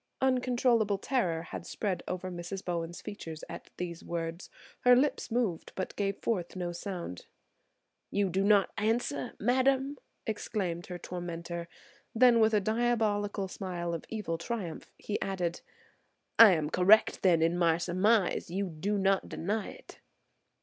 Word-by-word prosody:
Uncontrollable 245 -5 +2
terror 190 -9 0
had 170 - -7
spread 195 0 -2
over 185 0 -4
Mrs. 175 +2 -6
Bowen's 170 -1 -3
features 165 -7 -7
at - - -9
these 170 -2 -5
words. 165 +1 -4 0.3
Her 250 0 +6
lips 275 +4 +1
moved 225 -8 -1
but 190 - -4
gave 200 -1 -1
forth 185 -7 -2
no 175 -1 -3
sound. 175 - -6 0.8
"You 200 -2 0
do 190 +3 +1
not 205 -1 +4
answer, 210 - -1
madam!" 265 +4 +2 0.3
exclaimed 195 -6 -3
her 180 - -5
tormentor. 170 -1 -5 0.5
Then 240 0 +6
with 220 0 +4
a - - +5
diabolical 215 -2 0
smile 175 -3 -4
of 165 - -5
evil 205 -7 -3
triumph 180 -3 -5
he 210 - -3
added, 180 -3 -2 0.8
"I 225 -4 +11
am 155 -2 -1
correct 200 +5 +5
then 170 -4 +4
in 165 +1 +2
my 170 -2 +3
surmise; 185 +4 +2
you 195 +3 -1
do 190 +6 -2
not 195 0 +2
deny 205 +5 -2
it?" - - -13
195 Hz, 145 wpm, -30 LUFS, 170-220 Hz, 0.8 s, I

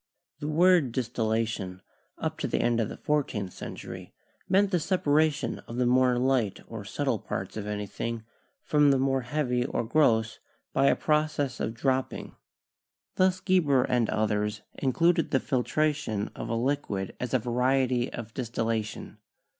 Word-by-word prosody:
The 150 - -4
word 165 -4 +4
distillation 110 -6 -2 0.3
up - - -3
to - - -1
the - - 0
end 120 -1 +2
of 110 - 0
the - - -7
fourteenth 120 -11 -1
century - - -8 0.3
meant 195 +1 +4
the 180 - +2
separation 155 -3 +1
of 115 - -7
the 125 0 +1
more 125 0 +4
light 125 -5 +1
or - - -7
subtle - - -1
parts - - -5
of 105 -1 -4
anything 105 +2 -4 0.4
from 150 -1 +4
the 135 - +4
more 135 0 +1
heavy 125 -1 0
or 125 - -1
gross 115 -4 +2 0.3
by 135 +1 +3
a - - +5
proc 155 0 +1
ess 135 -3 -1
of 110 - -2
dropping. 130 +2 -1 0.8
Thus 185 0 +3
Geber 155 -9 +3
and 120 -3 +1
others 105 -1 0
included 165 +5 +2
the 135 - +2
fil 130 -3 0
tration 145 -10 -1
of - - -6
a 115 - 0
liquid 115 -6 -1
as 125 0 -2
a - - +6
variety 125 +1 +1
of 115 -2 -7
distillation. 115 -3 -3
125 Hz, 155 wpm, -28 LUFS, 115-145 Hz, 0.8 s, a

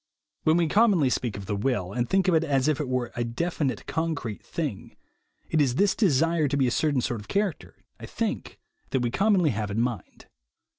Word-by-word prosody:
When 155 +1 +4
we 170 -1 +2
commonly 195 - +3
speak 120 -6 -2
of 100 - -7
the 100 - -2
will, 100 -4 -1
and 120 -1 -1
think 190 -1 +2
of 185 - +4
it 160 0 +3
as 140 -3 +1
if 155 -3 +1
it 140 - -4
were 125 -2 -1
a 120 - -1
definite 135 +4 -2
concrete 155 -10 -3
thing, 150 - -5 0.6
it 160 - +3
is 130 -4 +1
this 200 +5 +3
desire 165 - +2
to 140 +1 -1
be 135 - +3
a 125 - +1
certain 145 0 +1
sort 120 -2 -2
of 105 - -14
character, 200 -4 -2 0.2
I - - -8
think, - - -3 0.3
that 130 - 0
we 120 -1 0
commonly 195 - +3
have 105 -1 -3
in 100 +2 -2
mind. 120 -2 -3
140 Hz, 210 wpm, -26 LUFS, 120-165 Hz, 0.6 s, When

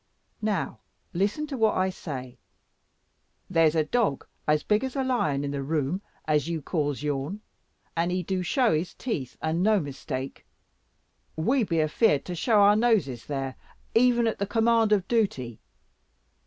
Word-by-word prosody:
Now 200 - -1 0.3
listen 205 - 0
to 285 -3 -5
what 220 -1 +3
I 185 0 +1
say. 130 -8 -7 1.1
There's 165 -3 +4
a 160 - +3
dog 205 - 0 0.2
as 150 0 +3
big 210 +3 +2
as 265 -1 -4
a 270 - 0
lion 155 - 0
in 140 - -2
the 140 -1 -3
room 150 +5 -1 0.2
as 150 0 +1
you 165 -1 -1
calls 145 -2 -2
yourn; 150 +7 -2 0.5
and 170 +1 +1
he 180 0 -1
do 185 +1 -1
show 240 - +2
his 160 +3 -2
teeth, 145 - -4
and 160 +2 0
no 210 +1 +4
mistake. 135 -3 -5 0.9
We 240 +11 +2
be 165 -5 0
afeared 155 0 +2
to 180 - -4
show 210 +5 +3
our 205 +1 +6
noses 210 - +1
there, 135 -2 -3 0.4
even 240 0 +4
at 225 - -1
the 200 - -1
command 225 0 +3
of 195 -3 +2
dooty. 135 - 0
180 Hz, 160 wpm, -27 LUFS, 145-220 Hz, 1.1 s, our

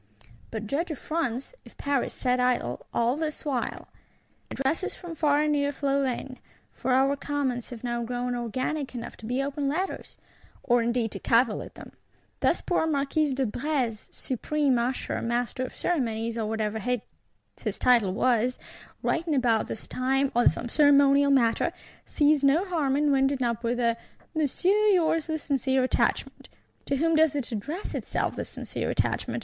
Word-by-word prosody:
But 220 -1 -5
judge 295 - -1
if 310 - -4
France, 275 - -3
if - - -17
Paris 280 -2 0
sat 250 -1 0
idle, 245 - 0
all 235 +2 +1
this 310 0 -4
while! 265 -5 -2 0.6
Addresses 290 +8 -1
from 350 -2 -8
far 295 -2 +2
and 305 - +1
near 285 -1 +1
flow 280 0 0
in: 255 0 -3 0.3
for 260 - -2
our 270 +2 +3
Commons 275 -4 -2
have 240 -2 -9
now 240 -1 -1
grown 245 +1 -2
organic 255 +4 -3
enough 235 -1 -6
to 245 +4 -2
open 280 0 -2
letters. 365 +7 -3 0.5
Or 240 -1 +3
indeed 235 -1 0
to - - -5
cavil 230 -2 +2
at - - -10
them! - - -11 0.5
Thus - - +2
poor 350 -3 +1
Marquis 290 0 +1
de 265 0 +1
Brézé, 245 -2 -2
Supreme 275 +2 0
Usher, 250 +2 -2
Master 240 +2 -1
of - - -9
Ceremonies, 230 -8 -1
or 225 -2 -2
whatever 220 0 -2
his 250 +1 -6
title 235 -6 +4
was, 245 +4 +1 0.5
writing 330 -2 0
about 235 -4 +2
this 220 - -6
time 270 +2 0
on 240 - +6
some - - -4
ceremonial 280 +1 +5
matter, 240 -5 +3 0.4
sees 295 -1 +3
no 295 +7 +4
harm 310 -8 0
in 295 0 +2
winding 270 -1 +2
up 235 -1 -1
with 240 +1 0
a 235 -1 +2 0.4
"Monsieur, 365 +7 +2
yours 330 -5 +3
with 315 -2 -3
sincere 265 -2 +1
attachment."—'To 270 +2 -2
whom 325 +3 +2
does 315 -2 +4
it 275 -4 -3
address 290 - -4
itself, - - -2
this - - -5
sincere - - -4
attachment? - - -1
265 Hz, 160 wpm, -27 LUFS, 240-295 Hz, 0.6 s, on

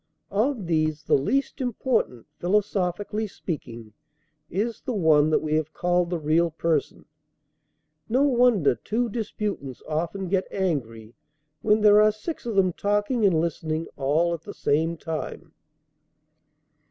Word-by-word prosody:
Of 220 +1 0
these, 155 -2 0
the - - 0
least 270 - +1
important, 245 - -1
philosophically 205 +2 0
speaking, 120 - -7 0.6
is 220 +6 -2
the 255 -4 -3
one 155 -5 +4
that 155 - +2
we 155 -1 -1
have 155 0 -1
called 175 0 +1
the 175 - -1
real 160 +2 +2
person. 160 -1 -1 1.0
No 255 +5 +3
wonder 245 - +4
two 230 - -2
disputants 205 - -4
often 170 +5 -2
get 190 +1 0
angry, 120 - -3 0.5
when 215 0 +3
there 210 0 +7
are 215 0 +5
six 240 +6 -6
of 225 - -2
them 185 -2 +3
talking 205 +5 0
and 170 -5 +2
listening 160 -1 -2
all 155 +5 +1
at 165 - -5
the - - -9
same 160 +3 0
time. 160 +1 -6
175 Hz, 135 wpm, -25 LUFS, 155-210 Hz, 1.0 s, there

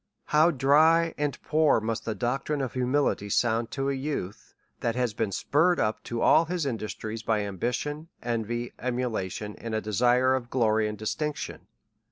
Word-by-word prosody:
How 155 +3 +4
dry 160 +4 +4
and 145 -2 -2
poor 155 -5 +3
must 110 +1 -3
the 110 - -2
doctrine 135 +4 -1
of 130 -3 -3
humility 130 -5 0
sound 115 +2 +1
to 135 +2 -2
a - - -1
youth, 135 -8 -5 0.2
that 115 -1 -1
has 125 -3 0
been 110 -2 -1
spurred 165 - +2
tip 110 - 0
to 120 -1 -3
all 165 - +5
his 175 -2 -2
industry 110 -3 -4
by 110 -1 +1
ambition, 125 - -3 0.2
envy, 120 0 -2
emulation, 110 -5 -3
and 115 -1 -4
a - - +1
desire 125 +5 +3
of 125 -2 -2
glory 110 -4 +2
and 105 0 -5
distinction! 145 +8 -4
125 Hz, 165 wpm, -27 LUFS, 110-145 Hz, 0.2 s, all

